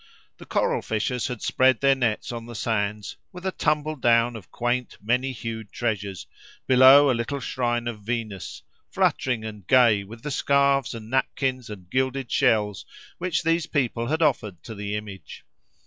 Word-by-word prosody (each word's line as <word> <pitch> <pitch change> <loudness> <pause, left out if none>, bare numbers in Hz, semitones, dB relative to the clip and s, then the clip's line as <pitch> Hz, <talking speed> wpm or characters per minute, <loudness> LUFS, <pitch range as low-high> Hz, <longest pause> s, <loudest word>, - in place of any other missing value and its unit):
The - - -12
coral - - 0
fishers 115 +3 -2
had 125 -4 -6
spread 130 -2 +3
their 135 0 +4
nets 125 -5 -1
on 115 -1 -6
the 120 - -9
sands, 105 -1 -2
with 180 0 -10
a 190 - 0
tumble 155 -2 0
down 120 -2 +3
of 100 -5 -10
quaint, 120 +1 -2
many 125 +5 0
hued 110 -3 -6
treasures, 105 -5 -3 0.4
below 130 +2 +7
a - - +2
little 120 +4 -3
shrine 120 -2 -2
of 110 -3 -5
Venus, 110 -3 -5 0.3
fluttering 120 -4 0
and 105 -4 -9
gay 120 -6 +5
with 115 +4 -12
the 150 - -4
scarves 140 -2 +2
and 110 0 -9
napkins 130 -2 -1
and 95 -4 -9
gilded 130 -1 -1
shells 105 -3 +2 0.4
which 180 -2 -1
these 165 0 +1
people 120 -5 -1
had 160 +4 0
offered 105 - 0
to 115 - -8
the 105 0 -4
image. 105 -2 -8
120 Hz, 165 wpm, -25 LUFS, 110-135 Hz, 0.4 s, below